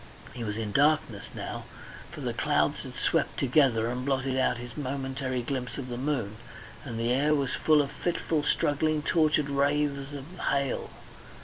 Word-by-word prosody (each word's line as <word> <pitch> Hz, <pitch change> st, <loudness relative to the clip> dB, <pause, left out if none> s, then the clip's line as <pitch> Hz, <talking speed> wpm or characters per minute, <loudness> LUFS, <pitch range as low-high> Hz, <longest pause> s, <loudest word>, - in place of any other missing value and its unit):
He 120 Hz, -, -5 dB
was 105 Hz, -1 st, -3 dB
in 110 Hz, -2 st, -3 dB
darkness 150 Hz, +7 st, +2 dB
now, -, -, -5 dB, 0.4 s
for -, -, -9 dB
the -, -, -2 dB
clouds -, -, +1 dB
had -, -, -9 dB
swept -, -, 0 dB
together 125 Hz, -4 st, +3 dB
and 125 Hz, +1 st, -2 dB
blotted 135 Hz, -1 st, 0 dB
out 130 Hz, -2 st, +2 dB
his 120 Hz, 0 st, -8 dB
momentary 135 Hz, -2 st, -2 dB
glimpse 125 Hz, 0 st, -3 dB
of 130 Hz, -3 st, -5 dB
the 120 Hz, -, -3 dB
moon, 125 Hz, -7 st, -1 dB, 0.5 s
and 120 Hz, -6 st, -5 dB
the 115 Hz, +1 st, +1 dB
air 150 Hz, +4 st, +3 dB
was 140 Hz, -3 st, 0 dB
full 155 Hz, -2 st, +4 dB
of 140 Hz, -, -6 dB
fitful 165 Hz, 0 st, -1 dB
struggling 150 Hz, +1 st, +1 dB
tortured 155 Hz, -3 st, +3 dB
wraiths 140 Hz, 0 st, +1 dB
of 140 Hz, -2 st, -6 dB, 0.2 s
hail. 140 Hz, -1 st, 0 dB
135 Hz, 170 wpm, -28 LUFS, 125-145 Hz, 0.5 s, full